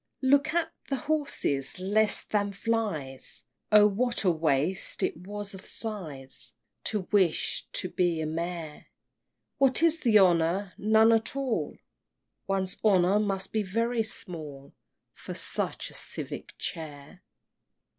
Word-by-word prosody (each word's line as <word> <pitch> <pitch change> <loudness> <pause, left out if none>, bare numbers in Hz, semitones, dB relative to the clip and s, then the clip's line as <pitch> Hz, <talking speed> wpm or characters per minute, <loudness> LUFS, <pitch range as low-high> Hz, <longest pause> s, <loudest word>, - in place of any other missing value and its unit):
VIII. 260 - +2
Look 285 +2 +4
at 330 -1 0 0.2
the 275 - +1
horses! 265 - -1
less 205 +3 +2
than 205 -1 -1
flies! 200 - -3 0.3
Oh, 210 -1 +8
what 235 +4 +1
a 185 - +4
waste 155 +2 0
it - - 0
was 205 +4 -7
of 190 - -9
sighs 145 - 0 0.3
To 210 -2 0
wish 190 -6 +2
to - - -1
be 175 -2 0
a 160 - -1
Mayor! 165 -1 -5 0.7
What 270 +3 +3
is 330 -1 +4
the 230 -7 +4
honor? 180 0 +3
none 220 +2 +5
at 225 +3 +1
all, 270 -4 -2 0.7
One's 190 -1 -1
honor 195 -1 +4
must 195 -2 0
be 220 - +2
very 230 +4 0
small 155 -10 -7 0.4
For - - -8
such - - -2
a - - -15
civic - - -6
chair! 155 +2 -6
195 Hz, 135 wpm, -28 LUFS, 165-225 Hz, 0.7 s, Oh